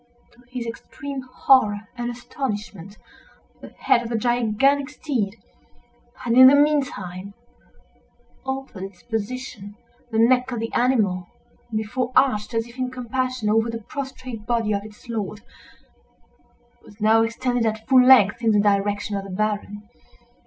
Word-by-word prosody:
To 235 - -25
his 250 -2 -5
extreme 275 +4 -7
horror 250 -4 +3
and 240 -1 -3
astonishment, 210 - -6 0.6
the - - -10
head 235 - +1
of 235 - -6
the 230 - -1
gigantic 245 +4 +1
steed 260 -9 -3 0.9
had, 235 - -1
in 260 +1 +9
the 275 - +7
meantime, 205 -11 0 1.1
altered 265 -6 -5
its 195 -2 -13
position. 225 -2 -5 0.3
The 220 - -2
neck 250 +3 +3
of 240 - -3
the 225 0 -4
animal, 210 -8 +1 0.4
before 230 +4 -2
arched, 240 -4 +2
as 225 0 0
if 240 +2 -14
in 255 0 -1
compassion, 255 -1 -3
over 225 +2 +2
the 230 -1 -5
prostrate 255 -5 -7
body 230 -3 +1
of 200 0 -2
its 215 +3 -14
lord, 215 -2 -4 1.4
was 205 - -17
now 220 +1 +4
extended, 235 +1 0
at 220 0 -4
full 260 -2 +6
length, 240 -5 +6
in 225 -1 +3
the 210 - +4
direction 205 0 +1
of 195 - -4
the 195 - -9
Baron. 210 +1 -3
230 Hz, 145 wpm, -23 LUFS, 210-255 Hz, 1.4 s, in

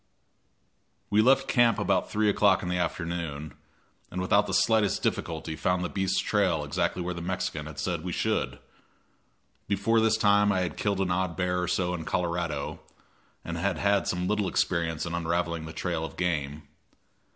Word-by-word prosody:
We 105 +1 +5
left 135 +3 +4
camp 120 -3 +4
about - - +1
3 105 0 +1
o'clock 100 -2 +3
in 90 - -3
the 90 - 0
afternoon, 85 -5 -3 0.6
and 90 - -5
without 100 +3 +3
the - - -3
slightest 110 -3 +2
difficulty 80 -1 -2
found 90 +2 0
the - - -2
beast's 95 -1 0
trail 90 -7 +1
exactly 75 +4 -1
where 90 +1 -2
the 85 - -6
Mexican 90 -4 -3
had 80 -3 -9
said - - -2
we - - -3
should. - - -1 1.1
Before 105 +3 +2
this 110 0 +3
time 105 -1 +4
I 95 -2 +1
had 90 - -2
killed 100 -2 0
an 90 -2 0
odd 90 -2 -1
bear 90 0 0
or 90 - -1
so 90 0 0
in 85 -2 -4
Colorado, 85 -4 -2 0.7
and 85 0 -4
had 95 -1 0
had 100 +2 +2
some 90 0 -1
little 105 -1 +1
experience 85 -4 0
in 85 - -4
unraveling 85 -1 -1
the 80 - -7
trail 85 -1 -2
of 80 - -7
game. 75 -4 -1
90 Hz, 175 wpm, -28 LUFS, 85-100 Hz, 1.1 s, We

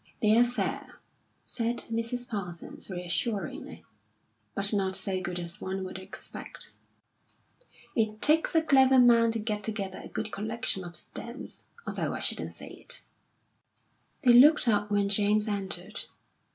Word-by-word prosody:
"They're 220 +2 +5
fair," 245 +1 -3 0.4
said 235 0 -2
Mrs. 230 +2 -1
Parsons, 190 -8 -5
reassuringly; 185 +4 -4 0.7
"but 200 +2 +2
not 190 -2 0
so 190 -1 0
good 175 0 -4
as 170 +3 -3
one 190 0 -3
would 185 0 -6
expect." 190 +1 -6 1.2
"It 215 -2 0
takes 315 +5 +3
a 325 - +5
clever 265 -3 +5
man 235 -2 +6
to - - -1
get 210 -1 -3
together 200 -3 -4
a - - -8
good 220 -1 -4
collection 220 -2 -2
of 175 -1 -7
stamps, 235 +3 -6 0.2
although - - -2
I - - -4
shouldn't - - 0
say - - -9
it." - - -6 1.2
They 245 -2 +7
looked 285 +3 +7
up 210 -2 +2
when 205 -1 +2
James 210 +1 +3
entered. 200 -2 -4
215 Hz, 140 wpm, -29 LUFS, 195-240 Hz, 1.2 s, They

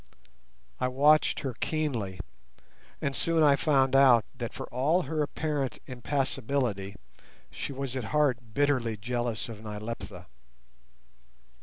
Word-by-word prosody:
I 125 - +1
watched 145 +4 +4
her 135 -3 -3
keenly, 120 - -2 0.8
and 140 -1 -1
soon 165 -1 +2
I 145 -2 +6
found 135 -2 +2
out 130 -5 +6
that - - -4
for - - -6
all 150 +9 +2
her 160 -2 -2
apparent 145 -2 -2
impassibility 125 -5 -2 0.6
she - - -5
was 135 -1 -4
at 130 -4 -3
heart 125 -4 0
bitterly 130 -6 +1
jealous 120 +1 -2
of 110 -3 -9
Nyleptha. 105 +2 -6
130 Hz, 120 wpm, -29 LUFS, 115-145 Hz, 0.8 s, I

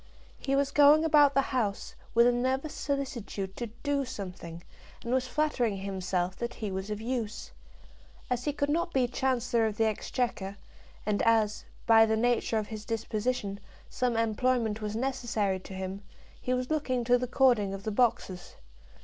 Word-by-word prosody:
He 275 - 0
was 280 0 +1
going 295 +2 +6
about 290 -3 +5
the 275 - +4
house, 210 -6 -1 0.2
with 235 +1 +7
a 245 - +5
nervous 260 +4 -1
solicitude 235 -9 -3
to 240 - -4 0.2
do 285 -1 +1
something, 180 -8 -7 0.4
and 235 - -2
was 255 0 +1
flattering 255 -7 0
himself 185 -2 -2
that 235 0 -4
he 215 -3 -4
was 190 +2 -4
of 210 0 -3
use. 230 -2 -4 0.8
As 250 0 -2
he 295 - +1
could 285 0 -1
not 340 +2 0
be 255 -2 +3
Chancellor 245 -2 +1
of 210 -1 -4
the 225 - +3
Exchequer, 215 -2 -2 0.5
and 210 -1 +1
as, 220 -2 +2 0.2
by 225 -1 +7
the 220 0 +1
nature 235 -1 +1
of 215 -1 -2
his 215 -2 -6
disposition, 215 -2 -2 0.3
some 250 -3 0
employment 225 0 +1
was 210 0 -3
necessary 230 -6 -1
to 190 - -11
him, 190 +1 -5 0.4
he 250 - -2
was 255 +3 -3
looking 255 -5 0
to 245 +1 +4
the 250 - -2
cording 240 -6 +3
of 195 0 -6
the 215 - -2
boxes. 205 -6 0
235 Hz, 170 wpm, -29 LUFS, 210-255 Hz, 0.8 s, with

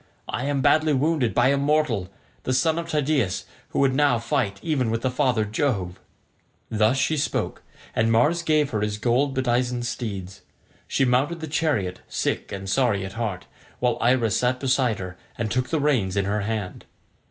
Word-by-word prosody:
I 125 - -3
am 140 -1 0
badly 155 +3 +4
wounded 140 -3 +1
by 125 +2 +4
a 140 - +3
mortal, 140 -10 +1 0.3
the 130 - -1
son 160 +4 +2
of 165 0 -6
Tydeus, 140 - 0 0.2
who - - -5
would 135 -1 +3
now 145 -3 +3
fight 115 -3 -1
even 140 -8 0
with 115 +1 -2
father 125 -5 +2
Jove." 105 -5 -1 0.7
Thus 110 +3 +3
she 155 +4 +1
spoke, 145 - -2 0.3
and 110 +1 +2
Mars 145 +10 +3
gave 155 -3 +2
her 110 -3 -1
his 105 0 -1
gold 130 +5 +1
bedizened 125 -1 0
steeds. 100 -5 -5 0.5
She 135 - +1
mounted 135 +7 +1
the 160 - -4
chariot 145 - 0
sick - - -2
and 95 -1 -5
sorry 100 -3 +1
at 95 - -7
heart, 105 -5 -3 0.3
while 125 -2 0
Iris 120 -3 +3
sat 125 +1 +1
beside 130 -4 +1
her 95 -1 -7 0.2
and 110 -1 -2
took 125 +1 0
the 160 - 0
reins 120 -10 +1
in 100 - +1
her 105 +2 0
hand. 105 -3 -4
125 Hz, 175 wpm, -24 LUFS, 105-140 Hz, 0.7 s, badly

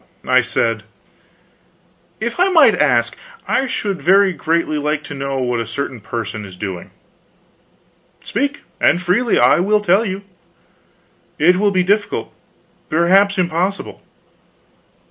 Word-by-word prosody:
I 130 0 +4
said: 115 -3 -1 1.4
"If 235 +7 -4
I 365 +2 +4
might 315 - +6
ask, 120 -8 +1 0.3
I 265 - 0
should 205 -6 -3
very 195 +1 +4
greatly 165 -2 -1
like 150 +1 -2
to - - -8
know 135 -1 -4
what 125 -2 -1
a 115 - -4
certain 130 -3 -5
person 110 0 -5
is 95 -2 -11
doing." 90 -2 -6 1.3
"Speak, 285 +6 -2 0.2
and 175 - +3
freely. 185 +7 +1
I - - +4
will 210 +4 +2
tell 205 +1 +2
you." 195 -2 -4 1.1
"It 175 +4 +4
will 205 +2 +2
be 185 -2 +1
difficult 205 +3 -1 0.6
perhaps 190 +5 +3
impossible." 180 +2 -2
175 Hz, 125 wpm, -18 LUFS, 130-205 Hz, 1.4 s, might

